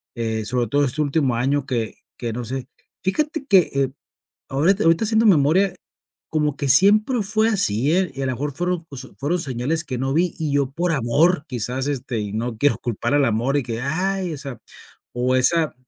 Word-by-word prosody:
eh, 110 -2 -2
sobre 120 0 0
todo 145 +5 +2
este 140 +4 -1
último 140 -4 +1
año 135 +3 0
que 120 -5 -2 0.2
que, 120 -2 -3
no 120 +1 -4
sé, 130 +2 -5 0.4
fíjate 300 - -1
que, 200 -8 +6
eh, 135 -1 +1 0.6
ahorita 175 +10 +2
ahorita 165 +6 +3
haciendo 220 +1 +2
memoria, 180 +2 +4 0.6
como 150 -2 0
que 140 - -2
siempre 210 - +4
fue 215 +3 +1
así, 145 - +1
eh, 185 -3 +1
y 135 - -5
a - - -1
la 130 - -1
mejor 145 +4 -3
fueron, 175 +3 -2
pues, 135 -2 -8
fueron 155 +6 0
señales 140 +3 -1
que 130 -4 -4
no 135 +1 -1
vi, 175 +3 +1
y 155 -3 -2
yo 140 -2 +1
por 170 +4 -1
amor, 150 +6 +2
quizás, 125 +2 -3
este, 130 -4 -3
y 105 -1 -5
no 115 +1 -3
quiero 145 +4 +2
culpar 120 +3 -2
al 145 -1 +4
amor 120 +5 +1
y 140 - +1
que, 115 -1 -4
¡ay! 180 +5 -1
o - - -7
sea, 135 -4 -7 0.5
o 125 +1 0
esa 160 +5 +3
140 Hz, 200 wpm, -22 LUFS, 125-175 Hz, 0.6 s, que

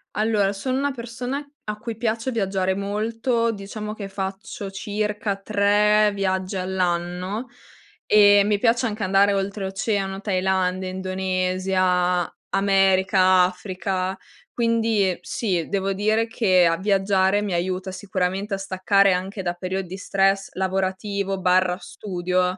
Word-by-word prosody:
Allora 210 -2 +1
sono 255 +6 -2
una 285 +1 0
persona 250 +3 -5 0.2
a 210 0 -4
cui 225 +1 -6
piace 225 +2 -1
viaggiare 195 -4 0
molto. 225 +4 -1
Diciamo 210 +1 -6
che 200 -2 -7
faccio 195 +1 -5
circa 210 +1 -2
3 210 +1 +3
viaggi 190 0 -1
all'anno 185 +3 -2 0.6
e 205 -1 +7
mi 205 0 +1
piace 240 +4 +2
anche 215 -1 -4
andare 195 +1 +4
oltreoceano, 195 0 -2
Thailandia, 185 -1 0
Indonesia, 185 -1 0 0.2
America, 190 -1 +4
Africa. 185 +1 -2 0.3
Quindi, 230 -4 +1
ehm, 180 - -2
sì, 180 -8 -2
devo 195 0 0
dire 215 +3 +1
che 190 -6 +3
a 165 - +3
viaggiare 195 0 +2
mi 200 -3 -2
aiuta 185 +2 -2
sicuramente 195 +1 -2
a - - -5
staccare 195 0 +2
anche 190 +2 -3
da 175 -1 -1
periodi 185 +1 -4
stress 195 0 +1
lavorativo 190 +1 -2
barra 180 -1 +2
studio. 180 -2 -2
195 Hz, 120 wpm, -23 LUFS, 185-210 Hz, 0.6 s, e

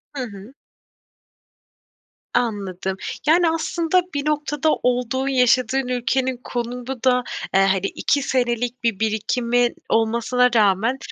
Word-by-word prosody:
Hı 265 - -2
hı. 205 +1 -10 1.8
Anladım. 190 -4 -2 0.3
Yani, 335 +2 +5
aslında 330 +2 +1
bir 285 0 -2
noktada 295 0 0
olduğun, 250 +2 0
yaşadığın 255 0 +2
ülkenin 255 +1 0
konumu 245 +1 -4 0.2
da, 250 -1 +3 0.3
eee, 195 - +5
hani, 195 0 +2
2 285 +7 0
senelik 245 -2 -1
bir 225 -4 0
birikimin 235 +3 +1 0.2
olmasına 235 +2 +2
rağmen, 215 +4 +3
245 Hz, 110 wpm, -21 LUFS, 225-265 Hz, 1.8 s, Yani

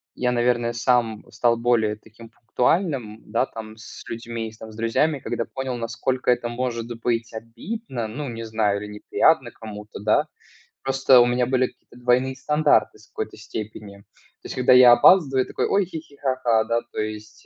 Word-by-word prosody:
Я, 125 0 0
наверное, 120 -1 +1
сам 120 -2 +1
стал 120 -1 +2
более 115 -3 +1
таким 110 +2 -16
пунктуальным, 125 - -1
да, 115 +4 +1
там 110 -1 -9
с 115 - -11
людьми, 115 -1 -5
с 110 - -19 0.2
друзьями, 115 +7 +1
когда 120 - -3
понял, 135 -1 -4
насколько 120 +3 -2
это 120 -1 +2
может 120 -1 -3
быть 115 -1 -1
обидно, 120 - -6
ну, 135 +6 -5
не 115 -1 -6
знаю, 110 -2 0
или 105 0 -7
неприятно 130 +5 +2
кому-то, 105 -2 -10
да. 105 +1 +2 0.5
Просто 135 -1 +4
у 120 - +5
меня 125 0 +1
были 130 0 +1
какие-то - - -20
двойные 125 +2 +1
стандарты 150 +3 +2
в - - -20
какой-то - - -6
степени. 105 -2 -8
То 100 - -28
есть - - -6
когда 130 0 +4
я 125 -1 +9
опаздываю, 135 -1 +5
такой: - - -2
"Ой-хи-хи, 165 -7 -2
ха-ха", 130 -5 +1
да, 115 +1 0
то - - -5
есть, 110 0 -6
120 Hz, 165 wpm, -23 LUFS, 110-130 Hz, 0.5 s, я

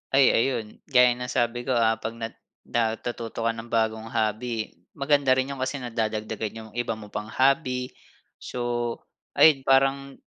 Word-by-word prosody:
Ay 135 0 +6
ayun 115 -3 +1 0.2
gaya 125 -2 +6
ng 125 0 -5
sabi 120 0 0
ko, 130 - -2
ah, 115 -2 +3
'pag 110 0 -5
na 115 - -2 0.4
natututo 115 0 -2
ka 115 - 0
ng 115 +1 -9
bagong 110 0 0
hobby, 110 0 -2 0.2
maganda 140 -1 +2
rin 130 0 +3
'yong 140 -2 -4
kasi 130 +2 -2
nagdadagdagan 110 -3 -3
'yong 110 -1 -11
iba 115 -2 -2
mo 105 - -10
pang 105 +1 -6
hobby. 130 -1 +2 0.5
So, 120 -1 -3 0.4
ayun 145 -4 +7
parang, 135 +1 +2
120 Hz, 155 wpm, -26 LUFS, 110-130 Hz, 0.5 s, ayun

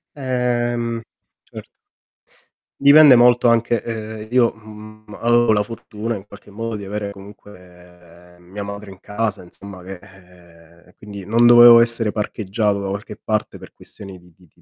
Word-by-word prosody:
Ehm, 120 -3 -2 0.4
certo. - - -13 1.1
Dipende 140 -1 +7
molto 120 0 +4
anche 115 -1 +1
uhm, 110 -1 -7
io, 120 -2 +3
mhmm, 110 -1 -14
avevo 120 -1 +2
la 105 - +1
fortuna, 115 +1 -6
in 95 -1 -10
qualche, 100 0 -16
modo 115 +2 -6
di 105 - -8
avere, 105 0 -5
comunque, 90 -3 -17
mia 95 +4 -9
madre 100 0 -9
in 95 -1 -14
casa, 105 -1 -4
insomma 95 +1 -13
che 95 0 -10
ehm, 85 -3 -21
e 90 - -25
quindi, 100 -1 -11
non 115 +4 +2
dovevo 120 0 +8
essere 115 -2 +3
parcheggiato 105 -1 -3
da 100 - -5
qualche 100 +2 -7
parte 110 -1 -3
per - - -14
questioni 95 -2 -12
di 90 -1 -23
di 90 -2 -24
105 Hz, 150 wpm, -19 LUFS, 95-115 Hz, 1.1 s, dovevo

